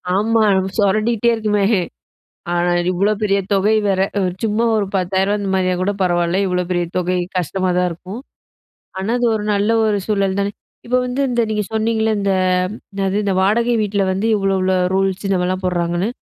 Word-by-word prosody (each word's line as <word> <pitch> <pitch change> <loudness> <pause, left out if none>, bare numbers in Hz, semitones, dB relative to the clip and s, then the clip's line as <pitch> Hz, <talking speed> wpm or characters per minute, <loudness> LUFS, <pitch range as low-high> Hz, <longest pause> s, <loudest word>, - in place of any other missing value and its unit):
ஆமா, 225 +3 +2
நம்மளுக்கு 190 0 -2
சுரடிண்டிட்டே 215 +3 +2
இருக்குமே. 210 -2 0 0.9
ஆ - - 0 0.4
இவ்ளோ 195 +4 +1
பெரிய 200 -2 +2
தொகை 200 +3 +3
வேற. 190 -1 +1 0.2
ஒரு 180 -2 -1
சும்மா 225 +2 +1
ஒரு 205 - 0
ரூ.10,000 190 +2 +1
அந்த 200 -1 -3
மாதிரியா 185 -1 +1
கூட 200 - +1
பரவாயில்ல. 175 0 +1
இவ்ளோ 180 0 0
பெரிய 175 -1 0
தொகை, 180 0 0 0.2
கஷ்டமா 185 +2 -1
தான் 180 0 +2
இருக்கும். 185 +6 -8 0.8
ஆனா 190 +3 -2
அது 245 - +1
ஒரு 210 -1 -2
நல்ல 205 +2 +1
ஒரு 210 -2 +1
சூழல் 200 -2 0
தானே, 200 0 0 0.4
இப்போ 250 +1 +2
வந்து 250 +2 -3
இந்த 240 - +1
நீங்க 210 -1 0
சொன்னிங்கள்ள 220 0 0
இந்த 200 -1 0 0.6
என்னது? 195 0 -1
இந்த 195 - 0
வாடகை 230 +5 +2
வீட்டில 200 -1 0
வந்து, 195 +4 -1
இவ்ளோ 195 -1 0
இவ்ளோ 185 0 +1 0.2
ரூல்ஸ் 195 0 0
இந்த 195 - +2
மாதிரிலாம் 185 +1 -2
போடுறாங்கன்னு, 175 +2 -1
195 Hz, 175 wpm, -18 LUFS, 185-215 Hz, 0.9 s, தொகை